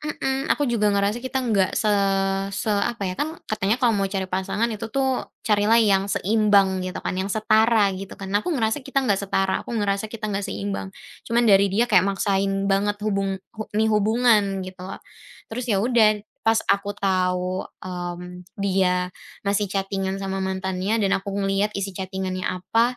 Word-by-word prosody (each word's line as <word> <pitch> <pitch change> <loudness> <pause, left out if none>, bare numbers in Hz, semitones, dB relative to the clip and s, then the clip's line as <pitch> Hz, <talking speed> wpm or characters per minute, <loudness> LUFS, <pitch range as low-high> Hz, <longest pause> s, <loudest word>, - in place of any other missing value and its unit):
mhm, 270 -2 -2
aku 290 - 0
juga 215 -3 +2
ngerasa 200 +3 +1
kita 260 +1 -2
nggak 200 -6 +2
se 215 - +2 0.7
se 215 - 0
apa 205 +1 -1
ya, 185 - -1
kan 315 - -3
katanya 210 0 0
kalau 245 -2 +2
mau 195 - 0
cari 190 -1 -2
pasangan 190 +4 -1
itu 220 +1 -5
tu, 270 +5 -1 0.4
carilah 210 +1 +3
yang 200 -2 +3
seimbang 200 -2 +3
gitu 185 - -5
kan, - - -1
yang 190 +1 -2
setara 215 -1 +3
gitu 195 +1 -7
kan. 195 -1 -7
Nah 205 - +3
aku - - -3
ngerasa 225 +4 0
kita 275 0 -1
nggak 200 -5 +2
setara, 195 -1 0
aku 235 - -4
ngerasa 205 0 0
kita 225 0 -7
nggak 195 - -1
seimbang. 200 -1 -4 0.4
Cuman 235 +1 +3
dari 200 -2 +5
dia 215 +5 +2
kayak 190 -6 +4
maksain 195 0 0
banget 200 +1 +1
hubung 195 -2 0 0.2
hu 215 - -3
nih 220 +1 +3
hubungan 210 -3 +3
gitu 185 -1 -10
loh. 190 - -6 0.6
Terus 245 +1 -3
ya 200 - +2
udah, 225 -4 +4 0.3
pas 225 0 +4 0.2
aku 200 0 -2
tahu, 185 -1 0 0.2
mmm, 180 0 -6
dia 185 -2 +1 0.3
masih 200 0 +1
chatting-an 195 0 -2
sama 195 0 -3
mantannya 190 +2 -1
dan 195 -1 +1
aku 200 - -9
ngelihat 200 +1 0
isi 195 -1 -3
chatting-annya 190 0 -3
apa, 235 +5 +1
200 Hz, 180 wpm, -23 LUFS, 190-220 Hz, 0.7 s, dari